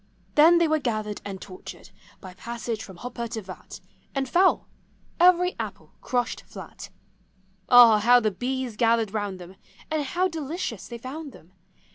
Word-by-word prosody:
Then 325 +3 +6
they 340 -1 +3
were 310 0 +1
gathered 215 -5 -3
and 195 -2 -6
tortured 185 +2 -11 0.3
By 185 -2 -10
passage 230 +2 -5
from 190 -3 -12
hopper 240 +2 -5
to 220 0 -5
vat. 185 0 -10 0.4
And 270 -1 -1
fell 365 +8 +3 0.3
— - - -35
every 360 +1 +5
apple - - -7
crushed 245 -2 -2
flat. - - -11 0.8
Ah! 235 -3 +8
how 245 +4 +6
the 215 -3 0
bees 250 +2 -3
gathered 230 -3 +2
round 205 -3 -3
them, 180 +1 -12 0.3
And 310 -1 0
how 355 +7 0
delicious 315 - -5
they 235 - -7
found 275 +4 -8
them! 170 - -17
240 Hz, 160 wpm, -25 LUFS, 210-300 Hz, 0.8 s, Ah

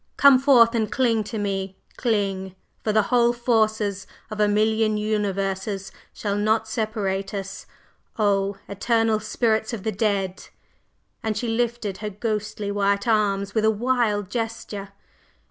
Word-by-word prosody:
Come 280 -2 +7
forth 250 -4 +6
and 220 -2 0
cling 230 -4 +2
to 220 - -5
me! 195 -2 -3 0.2
Cling! 195 -5 -1 0.3
for 215 - +1
the 215 0 +3
whole 240 -1 +4
forces 220 -4 0 0.2
of 215 - -5
a 210 - +4
million 215 +1 +2
universes 195 -2 -2 0.2
shall 200 -2 -3
not 215 +2 +1
separate 210 -3 -2
us! 195 0 -6 0.5
O 200 -2 +1
Eternal 225 +2 +1
Spirits 220 +1 0
of 210 -5 -5
the 220 - -1
Dead!" 195 -2 -1 0.7
and 220 -1 -2
she 235 - -2
lifted 230 -4 -1
her 210 0 -3
ghostly 210 0 -3
white 200 0 +1
arms 200 -3 +1
with 220 - +1
a 220 - +5
wild 220 -3 0
gesture. 225 -3 -4
215 Hz, 140 wpm, -24 LUFS, 200-225 Hz, 0.7 s, Come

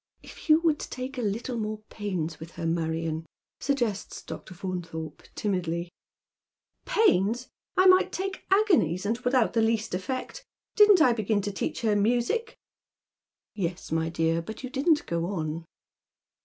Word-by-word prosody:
"If - - -12
you 310 +1 +7
would 320 -3 +2
take 255 +1 -5
a - - 0
little 230 +3 -2
more 215 0 -4
pains 175 -7 -3
with 165 +2 -10
her, 165 - -5
Marion," 165 -1 -1 0.4
suggests 240 -8 -1
Dr. 185 - -8
Faunthorpe, 165 -4 -5
timidly 175 -4 -2 0.5
" - - -56
Pains! 240 - +3 0.3
I 370 - +6
might 370 0 +6
take 385 +1 -4
agonies, 345 - +3
and 225 +3 0
without 245 -2 +2
the 230 - +3
least 225 -2 +1
effect. 255 - -4 0.3
Didn't 415 -5 +7
I 250 - +5
begin 215 -2 0
to 205 - -2
teach 195 - -3
her 220 -3 +2
music 240 - +1 0.3
" - - -66
" - - -66 0.2
Yes, 180 -4 -4
my 160 0 +1
dear, 165 0 +1
but 220 +9 -8
you 255 - -5
didn't 295 +3 +2
go 170 0 -1
on." 165 -3 -3
210 Hz, 155 wpm, -27 LUFS, 170-260 Hz, 0.5 s, you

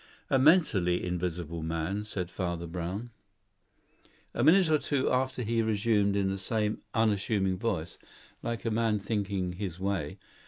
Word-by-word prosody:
"A 135 - +4
mentally 130 - +4
invisible 85 -2 -3
man," 85 +6 -2
said 90 -4 -4
Father 85 -2 -3
Brown. 90 +7 -5 1.2
A 120 - 0
minute 175 +5 +6
or 155 -1 +3
two 140 -3 0
after 130 0 0
he 115 +1 +1
resumed 105 -2 +2
in 100 -1 +1
the 95 - -3
same 105 +2 -1
unassuming 100 -3 +1
voice, 95 -8 -2 0.4
like 115 0 -4
a 115 - +1
man 110 -1 +2
thinking 100 -3 -2
his 90 -2 -5
way. 95 -6 -2
100 Hz, 145 wpm, -29 LUFS, 90-115 Hz, 1.2 s, minute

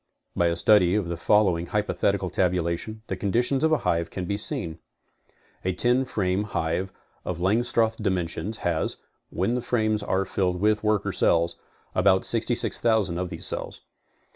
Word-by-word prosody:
By.a 85 -1 +2
study 95 -1 +4
of 100 -5 -1
the 85 - -2
following 90 -1 +2
hypothetical 100 -3 -1
tabulation, 90 +4 -1
the - - -3
conditions 120 +7 0
of 160 - +3
a 155 - +4
hive 85 0 0
can 95 - -5
be 100 - -2
seen. 85 -5 -2 0.8
A 95 - 0
ten 125 +7 +3
frame 95 -5 -1
hive 95 -1 -2 0.3
of 90 -2 -4
Langstroth 110 +3 +1
dimentions 95 +1 -2
has, 85 -3 0 0.3
when 95 +7 -1
the 125 - -1
frames 110 -3 0
are 95 -1 0
filled 90 -2 -1
with 105 +2 +1
worker 105 -2 +1
cells, 85 -2 +2 0.4
about 95 0 +3
66,000 110 -5 +1
of 90 -1 -3
these - - -5
cells. - - -3
95 Hz, 150 wpm, -25 LUFS, 90-110 Hz, 0.8 s, study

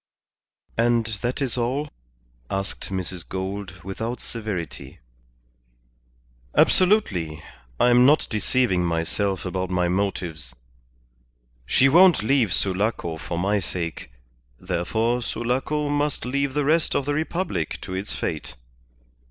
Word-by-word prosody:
"And 120 -1 +3 0.2
that 125 +3 -1
is 125 -1 -1
all?" 130 +5 0 0.6
asked 95 0 -3
Mrs. 95 -2 -3
Gould, 95 -1 -5
without 110 +5 -4
severity. 105 - -5 1.6
"Absolutely. 95 - +3 0.4
I 125 - +5
am 120 +1 +6
not 145 +4 +5
deceiving 110 -3 +1
myself 90 +4 0
about 95 0 -2
my 90 -1 +1
motives. 85 -8 -2 1.1
She 130 - +5
won't 175 - +6
leave 115 -4 +2
Sulaco 95 -3 0
for 85 +2 -5
my 100 +4 +1
sake, 85 -7 -5 0.5
therefore 110 +7 0
Sulaco 130 +6 -1
must 145 -2 0
leave 140 +1 -1
the 145 -1 +1
rest 160 +2 +2
of 140 - +1
the 145 - 0
Republic 160 - -2
to 95 - -6
its 95 +2 -3
fate. 75 -5 -4
105 Hz, 115 wpm, -24 LUFS, 90-130 Hz, 1.6 s, am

